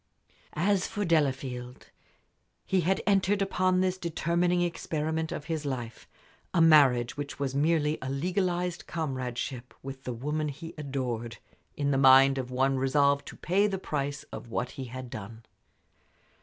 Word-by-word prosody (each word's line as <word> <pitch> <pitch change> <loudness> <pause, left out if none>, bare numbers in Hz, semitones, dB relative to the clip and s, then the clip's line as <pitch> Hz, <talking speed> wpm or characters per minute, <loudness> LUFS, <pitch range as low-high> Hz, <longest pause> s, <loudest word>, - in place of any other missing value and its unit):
As 190 +3 +2
for 205 -2 -3
Delafield, 130 -6 -1 0.7
he 190 -1 +2
had 190 +4 +1
entered 200 0 +3
upon 185 -1 +2
this 185 0 0
determining 175 +1 +1
experiment 160 -1 -2
of 145 - -5
his 160 -1 -3
life 120 -5 -5 0.5
a - - +4
marriage, 140 -7 +5
which 145 -1 -5
was 140 -2 -2
merely 150 +1 +1
a 130 - -4
legalized 180 +4 -1
comradeship, 130 -4 -4
with 135 0 -8
the 125 - -4
woman 150 +6 -2
he 155 +4 -8
adored 125 -6 -4 0.4
in 145 -1 0
the 135 - +2
mind 135 0 +7
of 125 -1 -4
one 135 +1 +1
resolved 140 +1 +2
to - - -8
pay 195 +4 +2
the 195 -2 -2
price 145 -5 -3
of - - -7
what 125 +2 -2
he 135 - -6
had 125 0 -8
done. 110 +2 -8
145 Hz, 150 wpm, -29 LUFS, 130-170 Hz, 0.7 s, mind